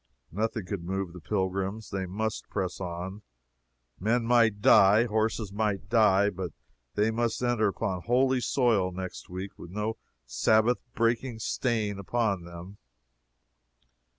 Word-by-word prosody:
Nothing 110 +1 -2
could 90 -1 -4
move 95 0 -3
the 90 - -9
pilgrims. 95 +2 -2
They 95 -1 -2
must 110 +4 -3
press 95 -3 -3
on. 90 +3 -5 0.8
Men 115 +4 +1
might 115 -3 +4
die, 105 -1 +6
horses 110 -2 -1
might 105 -2 -1
die, 105 -3 +4
but 90 -2 -5 0.4
they 105 +2 +2
must 115 0 -1
enter 120 -3 +2
upon 95 -2 -2
holy 130 +4 +2
soil 115 -9 +2
next 95 0 -7
week, 95 +2 -7
with 85 - -9
no 105 +4 -3 0.3
Sabbath 110 - +3 0.2
breaking 115 +1 0
stain 110 -3 -1
upon 100 -3 -1
them. 85 +4 -10
105 Hz, 130 wpm, -28 LUFS, 95-115 Hz, 0.8 s, die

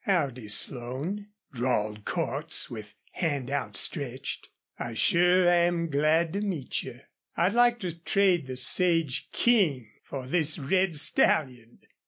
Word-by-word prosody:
"Howdy, 140 - -1
Slone," 130 - -2 0.3
drawled 110 -4 -2
Cordts, 160 -3 -2
with 105 -3 -9 0.2
hand 145 -7 -2
outstretched. 140 -2 -3 0.3
"I 115 -2 -5
sure 180 +7 +3
am 175 -1 +2
glad 155 +3 +2
to 200 - -2
meet 180 -11 -3
yuh. 125 -1 -10 0.4
I'd 180 +4 +2
like 240 0 +4
to 175 -4 -4
trade 180 -4 +1
the 130 -1 -5
Sage 165 0 +1
King 155 - +1
for 135 -2 -7
this 155 +2 +1
red 180 +4 0
stallion!" 130 -5 +2
155 Hz, 125 wpm, -27 LUFS, 130-180 Hz, 0.4 s, like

